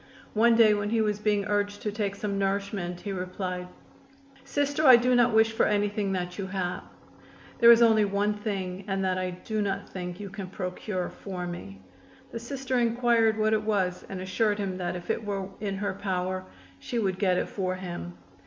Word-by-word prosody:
One 230 +2 +5
day 225 -2 +6
when 205 0 -1
he 230 +1 +1
was 210 -1 +1
being 210 -2 +1
urged 205 0 -1
to 210 - -1
take 205 -2 -2
some 200 -1 -3
nourishment 195 -2 -2
he 205 - -4
replied: 180 -1 -4 0.8
"Sister, 285 +2 -1
I 260 -4 +10
do 250 +1 +3
not 245 0 +5
wish 220 0 +4
for 225 - +2
anything 205 -1 0
that 180 0 -3
you 195 - -3
have. 185 -2 -3 0.8
There 235 -1 +9
is 235 0 +7
only 220 -2 +5
one 200 +1 +1
thing, 195 -3 -4
and 195 -1 -1
that 185 0 0
I 185 0 -1
do 210 +4 -3
not 200 0 -2
think 180 -1 -6
you 200 -2 -7
can 195 -1 -6
procure 185 0 -4
for 185 -3 -6
me." 100 - -7 0.5
The 230 - -5
Sister 260 +1 -2
inquired 235 -1 +3
what 215 0 +2
it 215 - +2
was 195 -4 0
and 195 - -5
assured 205 +3 0
him 195 -3 -3
that 175 -1 -2
if 175 -1 -3
it - - -2
were 200 -2 -3
in 200 -2 -3
her 200 +1 -2
power 185 -1 -2 0.3
she 240 - -4
would 190 -4 0
get 185 -3 +2
it - - 0
for 185 -2 -2
him. 175 - -7
200 Hz, 200 wpm, -27 LUFS, 185-220 Hz, 0.8 s, I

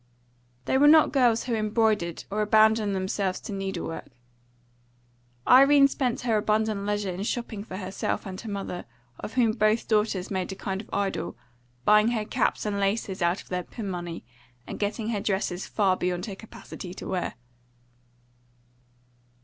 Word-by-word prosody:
They 265 - +2
were 290 - +6
not 310 +1 +7
girls 245 -4 +3
who 245 - -3
embroidered 215 -5 +1
or 210 +1 0
abandoned 215 -1 +4
themselves 190 0 -1
to 205 - -6
needle 195 -2 -3
work. 165 - -6 1.4
Irene 275 +2 +7
spent 255 -3 -1
her 230 -3 +1
abundant 215 -1 0
leisure 205 -2 -1
in 180 +2 -5
shopping 220 -1 -3
for 185 -4 -7
herself 190 0 -3
and 190 -1 -6
her 230 - -7
mother, 195 -3 -5 0.3
of 220 - -7
whom 240 -3 +3
both 215 0 +1
daughters 210 -4 0
made 190 0 -2
a - - -5
kind 190 0 -4
of - - -17
idol, 195 - -2 0.5
buying 210 +1 +6
her 215 -2 -1
caps - - 0
and 205 -1 -1
laces 195 -1 -1
out 175 +2 +1
of - - -22
their 180 0 -1
pin 210 +3 -7
money, 175 -6 -6 0.4
and - - -7
getting 215 +2 -2
her 210 -3 -1
dresses 190 -2 -2
far 195 -3 +2
beyond 180 -1 -2
her 200 - -6
capacity 190 -3 -10
to - - -7
wear. 185 -2 -2
205 Hz, 165 wpm, -26 LUFS, 190-220 Hz, 1.4 s, not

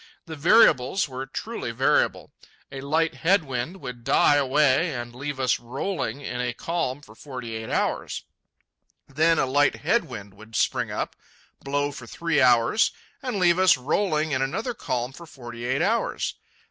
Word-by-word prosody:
The 160 -2 -7
variables 160 - +4
were 130 0 -6
truly - - -5
variable. - - +1 0.4
A 135 0 -6
light 160 +4 +1
head 180 +2 +2
wind 135 +7 -4
would 125 -3 -7
die 145 - +4
away 145 +2 +2
and 120 -1 -6
leave 135 +2 -5
us 130 -2 +2
rolling 135 +5 -3
in 125 -3 -4
a 125 -1 -2
calm 145 -5 -2
for 110 - -15
forty 125 -2 -7
eight 110 0 -6
hours. - - -1 0.8
Then 160 +4 +2
a - - +3
light 145 +3 +3
head 225 +10 +1
wind 105 -5 -9
would 110 +3 -13
spring - - +1
up, - - -3 0.5
blow 145 +1 -1
for 130 -4 -10
three 165 +2 0
hours, 125 - +4 0.3
and 255 -5 -3
leave 175 -1 +3
us 185 -6 +6
rolling 155 +3 0
in 130 -2 0
another 220 - -2
calm 125 - -3
for 170 +4 -12
forty 120 -4 -9
eight 130 +3 +1
hours. 230 +3 0
140 Hz, 165 wpm, -25 LUFS, 125-165 Hz, 0.8 s, us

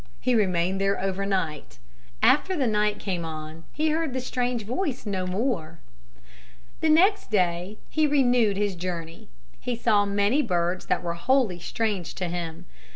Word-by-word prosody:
He 255 - +1
remained 190 -3 +1
there 195 0 +1
over 195 +1 -2
night. 165 -7 -2 0.5
After 365 +6 +4
the 275 - +1
night 210 -2 +1
came 180 -4 -3
on 155 0 -7
he 310 +1 0
heard 320 -3 -1
the 260 - -1
strange 245 -2 -2
voice 255 - -3
no 190 -3 -2
more. 180 -5 -2 1.0
The 320 - +1
next 380 +7 +4
day 180 0 0
he 310 -1 +2
renewed 245 -7 +3
his 205 -1 0
journey. 170 - -6 0.3
He 245 - -2
saw 215 -3 +3
many 205 +8 +2
birds 180 -5 -1
that - - 0
were 170 -1 -2
wholly 220 0 +1
strange 200 -1 -2
to 180 -2 -3
him. 170 0 -5
200 Hz, 155 wpm, -26 LUFS, 175-250 Hz, 1.0 s, After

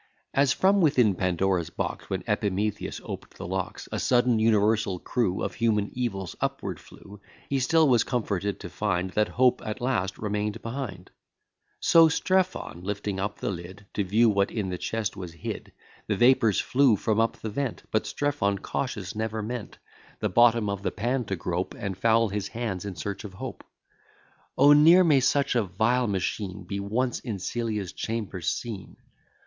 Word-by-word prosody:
As, 135 -1 +3
from 195 +7 +3
within 130 - +4
Pandora's 90 -1 0
box, - - -4
When - - -2
Epimetheus 105 +1 -1
op'd - - -8
the - - -7
locks, 95 +1 -4
A - - -2
sudden 120 -2 +3
universal 110 -2 +2
crew 95 -1 -1
Of - - -2
human 105 -3 +1
evils 100 -9 -3
upward - - -2
flew; 100 0 -14 0.3
He 135 - +2
still 160 +4 +4
was 120 -4 +4
comforted 100 -5 -2
to 90 - -6
find 95 -3 -1
That 105 +2 +2
hope 125 0 +2
at 110 +2 -4
last 120 -7 -1
remain'd 105 +1 -2
behind: 115 -7 -6 0.7
So 165 -1 +6
Strephon, 185 - 0
lifting 100 0 -3
up 105 +2 -3
the - - -2
lid, 95 +3 -8
To 105 - 0
view 110 +5 +3
what 100 -2 +2
in 105 -5 -3
the 90 -1 -4
chest 110 -2 -2
was 90 -4 -7
hid, 85 - -6 0.4
The 105 - +1
vapours 120 -4 +4
flew 130 -3 +4
from 110 +2 0
up 115 +1 +1
the 110 -1 -5
vent; 135 +2 -3
But 110 - 0
Strephon, 145 -9 0
cautious, 105 -1 -4
never 110 0 -3
meant 120 0 -5 0.4
The - - 0
bottom 115 -2 +4
of 100 -1 -2
the - - -1
pan 120 +3 -1
to 100 - -2
grope, 90 +1 -3
And 100 -2 -4
foul 115 +2 +3
his 100 0 -3
hands 105 -6 -4
in 100 -3 -5
search 100 +7 -5
of 100 -3 -9
hope. - - -7 0.9
O! 145 +1 +7
ne'er 165 +5 +7
may 150 -5 +5
such 140 +2 +2
a 120 - +3
vile 110 +6 +1
machine 95 0 -2
Be 100 +3 -4
once 115 +5 -1
in 115 -5 -4
Celia's 105 -1 -3
chamber 110 -5 -4
seen! 105 +2 -4
105 Hz, 175 wpm, -27 LUFS, 95-120 Hz, 0.9 s, O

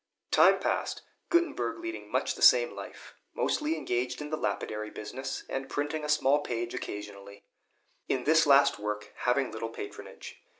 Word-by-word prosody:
Time - - +6
passed, - - -2 0.3
Gutenberg 340 -1 +1
leading 340 0 -6
much - - 0
the - - -11
same 485 -1 +7
life, - - -10 0.2
mostly 310 +2 0
engaged 125 +1 -2
in 150 0 -6
the - - +1
lapidary 105 -3 -3
business, 125 +6 -6
and 135 0 -4
printing 150 +3 -2
a 150 - -4
small 145 -1 +4
page 120 -4 -3
occasionally; 100 -1 -7 0.7
in 130 - 0
this 160 +2 +4
last 140 -4 +5
work 105 0 -4
having 125 +1 +1
little 115 +1 -4
patronage. 100 - -9
135 Hz, 155 wpm, -29 LUFS, 110-155 Hz, 0.7 s, same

